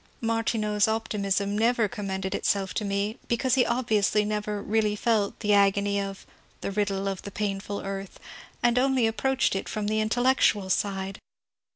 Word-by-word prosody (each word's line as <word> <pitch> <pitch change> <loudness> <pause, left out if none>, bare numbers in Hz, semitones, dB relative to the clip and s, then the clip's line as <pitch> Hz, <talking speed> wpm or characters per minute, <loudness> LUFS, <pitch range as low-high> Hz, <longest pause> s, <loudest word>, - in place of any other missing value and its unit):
Martineau's 225 -2 +1
optimism 205 -2 -1
never 230 +1 +2
conmiended 190 -2 -4
itself 195 -2 0
to 215 - -2
me, 200 +2 -2
because 240 +2 +1
he 260 -1 +5
obviously 215 -4 +2
never 210 0 -2
really 210 0 0
felt 210 -2 0
the 210 0 +2
agony 200 0 +3
of 195 -1 -6 0.2
" - - -34
the - - -3
riddle 200 -1 -1
of 195 -1 -3
the - - -7
painful 200 0 -3
earth," 195 -1 -6 0.4
and 240 +1 +4
only 260 -2 +3
approached 260 +2 +1
it 195 - -3
from 215 -1 -3
the 215 +1 0
intellectual 220 -4 +2
side. 195 -1 -1
210 Hz, 160 wpm, -27 LUFS, 200-225 Hz, 0.4 s, he